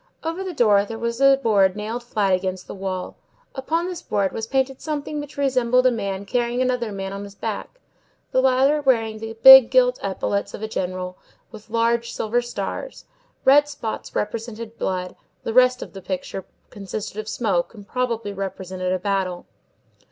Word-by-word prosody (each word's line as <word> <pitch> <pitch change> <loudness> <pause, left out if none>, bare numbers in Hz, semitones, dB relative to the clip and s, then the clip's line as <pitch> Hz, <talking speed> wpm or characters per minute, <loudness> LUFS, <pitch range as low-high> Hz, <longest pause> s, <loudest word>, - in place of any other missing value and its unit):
Over 330 +4 -3
the 375 - -4
door 210 -6 +4
there 225 +2 -6
was 235 +2 -3
a 275 0 +6
board 205 -7 +3
nailed 220 +3 -4
flat 210 -5 0
against 185 0 -2
the - - -8
wall. 190 -2 -5 0.4
Upon 320 +6 -1
this 360 -1 -5
board 195 -2 0
was 220 0 -5
painted 265 +1 -1
something 300 -1 -3
which 290 0 -8
resembled 255 -2 +2
a 255 - +6
man 200 -3 -3
carrying 240 +2 -1
another 250 -3 0
man 195 -1 -5
on 200 +1 -5
his 200 0 -11
back, - - -5 0.5
the 260 - +3
latter 265 +3 +3
wearing 225 -5 +1
the 225 0 -7
big 265 -2 +11
gilt 250 -1 +3
epaulettes 200 +1 -2
of - - -9
a - - -1
general, 185 -3 -4 0.3
with 220 0 -13
large 230 +1 +1
silver 235 +3 0
stars; 245 - -5 0.4
red 290 +2 +6
spots 235 -6 -6
represented 225 +1 -4
blood; 180 -1 -2 0.3
the 225 - -3
rest 255 +1 +4
of - - -12
the 195 - -9
picture 185 0 -5 0.3
consisted 205 +1 -6
of 215 0 -5
smoke, 210 -3 -1
and 205 -2 -12
probably 230 -4 -2
represented 190 -1 -4
a 185 - +1
battle. 185 -2 -2
225 Hz, 175 wpm, -23 LUFS, 195-255 Hz, 0.5 s, big